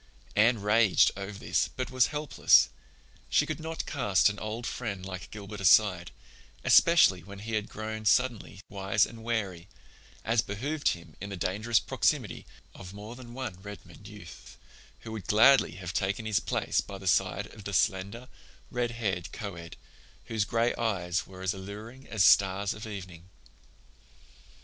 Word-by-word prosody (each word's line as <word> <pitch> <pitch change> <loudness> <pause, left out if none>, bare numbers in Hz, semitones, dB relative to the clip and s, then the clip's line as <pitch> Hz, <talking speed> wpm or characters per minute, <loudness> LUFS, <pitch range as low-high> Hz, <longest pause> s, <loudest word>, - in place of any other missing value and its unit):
Anne 115 +2 +4
raged 105 0 +4
over 100 0 -6
this 110 - 0
but 130 -1 -3
was 130 -1 +3
helpless; 150 -1 +3 0.6
she - - +3
could 155 -1 -4
not 160 +1 -5
cast 105 - +2
an 105 - -9
old 110 +2 -5
friend 100 -7 -4
like 95 -1 -7
Gilbert 105 -1 -8
aside, 90 -2 +4 0.5
especially 170 - +5
when 100 +4 -11
he 110 +3 -7
had 110 -1 -1
grown 110 0 -6
suddenly 115 -2 +1
wise 100 0 +1
and 115 -1 -11
wary, 100 -7 -3 0.6
as 115 0 +3
behooved 140 +11 -3
him 85 -2 -16
in 100 - -5
the 100 - -6
dangerous 105 +6 +1
proximity - - -1 0.3
of 95 +1 -11
more 105 +3 -9
than 120 -1 -11
one 115 -9 -6
Redmond 100 -1 -11
youth 105 -5 -12 0.4
who 110 - -9
would 110 -3 -7
gladly 115 - +5
have 90 -1 -7
taken 100 +3 -1
his 110 -2 +1
place - - -1
by 100 - -9
the 95 - -12
side 95 +2 +1
of 105 - -12
the 100 - -4
slender, 100 +5 0 0.4
red 120 -1 -1
haired 100 -7 -3
coed, 85 -6 -7 0.5
whose 110 -3 -1
gray 115 +2 +1
eyes 95 -6 -1
were 95 -1 -11
as 95 +2 0
alluring 105 +7 -9
as 105 -4 +2
stars 100 +1 +4
of 110 +1 -8
evening. 95 -4 -9
105 Hz, 160 wpm, -29 LUFS, 95-115 Hz, 0.6 s, especially